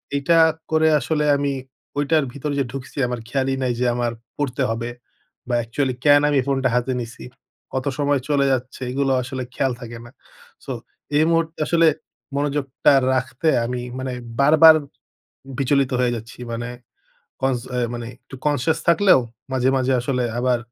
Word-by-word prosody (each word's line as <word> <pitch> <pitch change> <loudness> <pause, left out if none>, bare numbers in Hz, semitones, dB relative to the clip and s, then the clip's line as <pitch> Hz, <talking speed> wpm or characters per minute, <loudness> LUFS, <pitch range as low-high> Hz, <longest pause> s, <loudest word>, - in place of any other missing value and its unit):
এইটা 155 +4 +3 0.3
করে 160 0 +4
আসলে 150 0 0
আমি 140 0 0 0.5
ওইটার 150 +1 +2
ভিতরে 145 +1 -3
যে 135 - +1
ঢুকছি 135 0 -8
আমার 125 -1 -3
খেয়ালই 135 0 0
নাই 125 -1 +1
যে 125 - +1
আমার 120 -1 0 0.3
পড়তে 140 -2 -1
হবে। 115 +1 -3 0.6
বা 120 - 0
actually 130 +2 -1
কেন 145 0 +7
আমি 145 -2 +3
ফোনটা 135 -2 +1
হাতে 125 +1 0
নিছি? 115 - -9 0.5
কত 130 0 -2
সময় 145 -1 +2
চলে 140 -1 +3
যাচ্ছে? 130 +1 -4
এগুলো 135 0 0
আসলে 130 0 -5
খেয়াল 135 -2 +1
থাকে 120 0 -8
না। 120 - -13 0.5
সো - - -5 0.5
এই 155 - +4
মুহূর্তে 165 0 0
আসলে 165 -1 +4 0.5
মনোযোগটা 140 -1 +1 0.2
রাখতে 130 +3 -2 0.2
আমি 125 0 -3 0.2
মানে 130 -1 -3 0.3
বারবার 155 +2 +8 0.8
বিচলিত 135 0 +2
হয়ে 120 -1 +2
যাচ্ছি। 115 +2 -9
মানে 120 +1 -4 0.7
কন্স 130 -2 +1
অ্যা 125 - 0
মানে 120 -1 -5
একটু 135 - -15
conscious 145 +1 +1
থাকলেও 170 -4 +6 0.3
মাঝে, 130 0 +2
মাঝে 130 0 +1
আসলে 125 0 -1 0.2
আবার 125 -1 +2
135 Hz, 155 wpm, -22 LUFS, 125-145 Hz, 0.8 s, বারবার